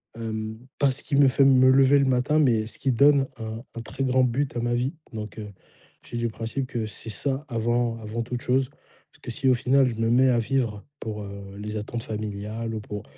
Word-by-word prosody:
hem, 110 -1 -4 0.2
pas 140 -2 +4
ce 135 - +2
qui 140 - -2
me 140 -1 +6
fait 135 +1 +4
me 130 -1 +6
lever 135 +1 +5
le 140 - +3
matin 130 +3 +2
mais 115 -7 +3
ce - - -3
qui 135 - +1
donne 140 +2 +4
un 110 0 -6
un 115 - -5
très 130 +3 -5
grand 130 0 +3
but 130 +2 0
à - - 0
ma 120 0 0
vie. 125 +7 -1 0.2
Donc 110 0 -6
heu, 105 -1 -7 0.5
j'ai 120 - -7
du 120 0 0
principe 115 +4 -4
que 120 -5 -3
c'est 105 +1 -4
ça, 135 +6 0
avant 120 0 0
avant 110 +1 -4
toute 120 +1 -5
chose. 130 +1 +1 0.4
Parce - - -24
que - - -8
si, 130 +3 -1
au 130 - +6
final, 130 +3 +3
je 125 - -1
me 115 0 0
mets 130 +3 +5
à 120 -2 +3
vivre 115 -3 -1 0.2
pour, 105 -1 -5
heu, 100 -1 -9
les 105 +1 -5
attentes 115 +2 -5
familiales 110 +1 -4
ou - - -3
pour 105 -1 -7
120 Hz, 230 wpm, -25 LUFS, 110-130 Hz, 0.5 s, me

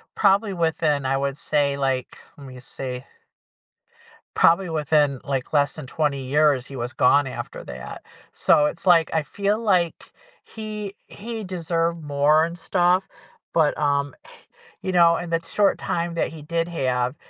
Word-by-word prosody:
probably 200 0 +3
within, 160 -4 0
I 135 +1 +1
would 140 0 -2
say, 145 -2 0
like, 135 -2 -2 0.2
lemme 130 -3 -11
see 125 0 -7 1.3
probably 170 +2 +4
within, 150 -3 +1
like, 135 -1 -3
less 145 -1 +2
than 155 - -8
20 140 -1 -1
years, 145 -1 +2
he 135 - -10
was 120 0 -4
gone 140 +2 +4
after 130 - -7
that. 65 0 -9 0.3
So, 150 - +3
it's 165 - -7
like 170 -3 +5
I 160 -1 +1
feel 200 +7 -1
like 185 -7 0 0.3
he 210 -2 -7
he 225 +1 -7
deserved 170 -2 -2
more 145 +2 +3
and 170 +1 -7
stuff, 180 +2 +1 0.5
but, 155 -3 +2
um, 145 -1 0 0.7
you 190 - -2
know, 170 -2 +5
in 175 - -6
that 165 0 -1
short 200 +4 +2
time 170 0 -2
that - - 0
he 160 -1 -10
did 165 +2 -1
have, 125 -5 -1
155 Hz, 155 wpm, -23 LUFS, 140-175 Hz, 1.3 s, like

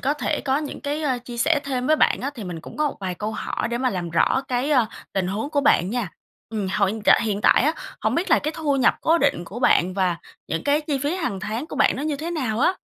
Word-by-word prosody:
có 280 +2 +1
thể 300 0 -1
có 270 0 +1
những 300 -2 -6
cái, 295 +2 -3
ơ, 265 -4 0
chia 240 -1 -7
sẻ 295 +4 +2
thêm 255 -2 -2
với 310 - +4
bạn - - +3
á, 275 +3 -2
thì 225 -6 -7
mình 170 -3 -6
cũng - - -11
có 300 -1 +1
một - - -8
vài 185 -2 -3
câu 210 +4 -4
hỏi 215 - -3
để 235 0 -2
mà 255 -1 +1
làm 175 -3 -3
rõ 260 +10 +2
cái, 255 +4 0
a, 250 -6 +4 0.3
tình 190 -2 0
huống 210 +9 -3
của 290 -2 +1
bạn 200 - +3
nha! 230 -8 -2 0.4
Ừm, 210 -3 -3
hồi 195 +1 +1
hiện 220 - -6
tại - - +6
hiện 205 -2 -1
tại - - +5
á, 305 +3 +3 0.3
hổng - - 0
biết 345 +3 -1
là - - +6
cái 305 - -3
thu 295 -3 0
nhập 260 - +4
cố 330 +1 +3
định 280 - +1
của 210 +7 -8
bạn 185 -6 +3
và 185 -3 +1 0.3
những 165 - -2
cái 290 +1 +3
chi 295 -2 -2
phí 290 +5 -1
hàng 255 - -3
tháng 225 +9 -3
của - - -7
bạn - - +3
nó 270 - -4
như 300 -1 -1
thế 320 +4 -4
nào 255 -9 -2
á? 365 +6 +3
255 Hz, 290 wpm, -23 LUFS, 205-295 Hz, 0.4 s, tại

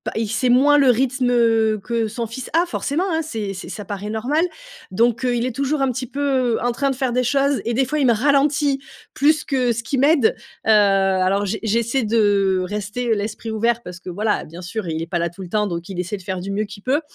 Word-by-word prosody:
il 225 0 -1
sait 235 +4 0
moins 280 +4 +5
le 275 -3 +5
rythme, 255 +1 +1
heu, 225 -2 +3
que 230 0 -1
son 230 +2 -4
fils 235 +3 -7
a 335 +2 +3
forcément, 340 +1 -1
hein, 320 0 +1
c'est 220 -9 -4
c'est 185 - -8
ça 210 - -7
paraît 205 +2 -5
normal. 255 +9 0 0.5
Donc, 235 +5 +1
heu, 245 -1 +1
il 240 0 0
est - - -2
toujours 280 +1 -1
un 270 - +2
petit 255 +1 -4
peu 265 -3 0
en 245 - +1
train 275 +3 0
de - - -3
faire 260 -1 -1
des 250 +1 +1
choses 275 +2 +1
et 235 - -1
des 265 +3 +2
fois 300 +5 -2
il 280 - +2
me 235 - +5
ralentit 280 +3 +2 0.4
plus 300 +2 +3
que 255 -3 +1
ce 235 0 -2
qu'il 260 +4 -1
m'aide. 285 -4 +4 0.3
Heu, - - +2
alors 195 -2 +3
j 215 +3 -2
j'essaie 230 +4 0
de 205 -4 +2
rester 210 +4 -2
l'esprit 210 +2 -4
ouvert 230 +2 0
parce 180 0 -9
que 185 - -9
voilà, 210 +4 -1
bien 170 +3 -10
sûr, 185 +2 -5
il 160 0 -2
est 165 - -4
pas 175 - -1
là 170 0 0
tout 175 +4 -12
le 180 - -8
temps, 210 +2 +1
donc 170 0 -5
il 190 -2 -5
essaie 180 +3 -3
de 190 - -13
faire 185 +1 -3
du 195 +2 -5
mieux 210 +2 -1
qu'il 200 0 -12
peut. 275 +4 +1
230 Hz, 250 wpm, -21 LUFS, 205-265 Hz, 0.5 s, moins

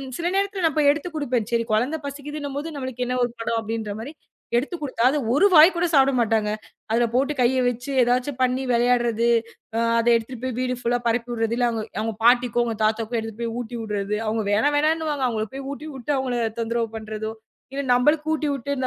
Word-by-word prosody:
ம். 265 -1 -7
சில 340 - -2
நேரத்துல 395 -1 -1
நான் 315 - 0
போய் 290 -1 +5
எடுத்துக் 320 +3 -6
குடுப்பேன். 245 -7 -1
சரி 230 0 +2
குழந்தை 255 +9 +1
பசிக்குதுன்னும்போது 290 +1 -5
நம்மளுக்கு 260 -2 -3
என்ன 250 - -1
ஒரு 240 - -3
படம் 230 0 -1
அப்படின்ற 220 -1 -4
மாரி 275 +7 -7 0.4
எடுத்துக் 295 +7 -1
குடுத்தா, 255 -4 -1
அது 300 - 0 0.2
ஒரு 390 +8 +5
வாய் 320 +4 +9
கூடச் 345 -1 0
சாப்ட 270 0 +5
மாட்டாங்க. 220 -2 +1 0.4
அதுல 235 +2 +3
போட்டு 275 +4 +2
கைய 255 +1 +3
வச்சு 245 +3 -4
எதாச்சு 250 +3 +1
பண்ணி 255 +1 +1
வெளையாடுறது, 235 -1 +2 0.5
அ. - - +1 0.2
அதை 235 +1 +3
எடுத்துட்டு 230 +1 -5
போய் 255 -2 -3
வீடு 255 0 0
ஃபுல்லா 240 +1 +1
பரப்பிவுடுறது, 230 -1 0
இல்ல 245 - +2
அவங்க-அவங்க 220 0 -3
பாட்டிக்கும், 240 -1 +3
தாத்தாவுக்கும் 225 +2 0
எடுத்துட்டு 225 +1 -7
போய் 230 -1 -2
ஊட்டிவுடுறது. 215 -4 -3
அவங்க 220 0 0
வேணா 215 +8 +3
வேணான்னுவாங்க. 305 -2 +1
அவங்களுக்கு 220 0 -3
போய் 275 - -6
ஊட்டி 300 +2 -7
வுட்டு 265 +3 -3
அவங்கள 255 -2 -1 0.2
தொந்தரவு 230 0 -1
பண்றதோ, 220 0 -5 0.4
இல்ல 280 0 -2
நம்மளுக்கு 300 +5 +2
ஊட்டிவுட்டு 280 -3 -2
245 Hz, 185 wpm, -23 LUFS, 230-285 Hz, 0.5 s, வாய்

